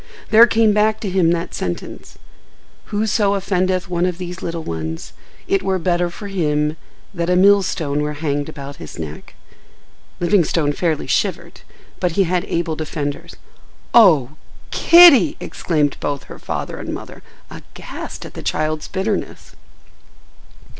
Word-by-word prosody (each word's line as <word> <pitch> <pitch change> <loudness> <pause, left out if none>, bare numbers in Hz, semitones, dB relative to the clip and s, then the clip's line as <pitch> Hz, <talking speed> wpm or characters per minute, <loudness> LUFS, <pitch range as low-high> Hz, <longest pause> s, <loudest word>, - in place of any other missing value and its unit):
There 225 +2 +8
came 225 -2 +3
back 215 +1 +2
to 205 - -3
him 180 -3 +3
that 170 0 -1
sentence, 85 -1 -6 0.7
"Whoso 210 -1 +1
offendeth 185 -1 0
one 175 0 0
of 180 -2 -3
these 180 0 -7
little 165 -1 -4
ones, 80 - -5 0.3
it 195 - +1
were 190 -1 0
better 175 0 0
for 200 +4 -9
him 150 -5 0 0.4
that 170 -2 -2
a 180 - +3
millstone 185 -6 +3
were 150 0 -2
hanged 145 -1 -2
about 140 -2 -9
his - - -10
neck—." 80 -2 -8 0.8
Livingstone 170 -5 +2
fairly 160 -1 -1
shivered, - - -2 0.4
but 180 -2 0
he 195 - +3
had 180 0 -1
able 165 -1 -2
defenders. 150 -2 -5 0.6
"Oh, 160 - +6 0.4
Kitty!" 335 - +7
exclaimed 150 -4 -1
both 145 -1 -3
her - - -12
father - - -5
and - - -6
mother, - - -10 0.3
aghast - - -9
at - - -10
the - - -8
child's 155 0 -2
bitterness. 195 +2 -4
175 Hz, 140 wpm, -19 LUFS, 150-195 Hz, 0.8 s, There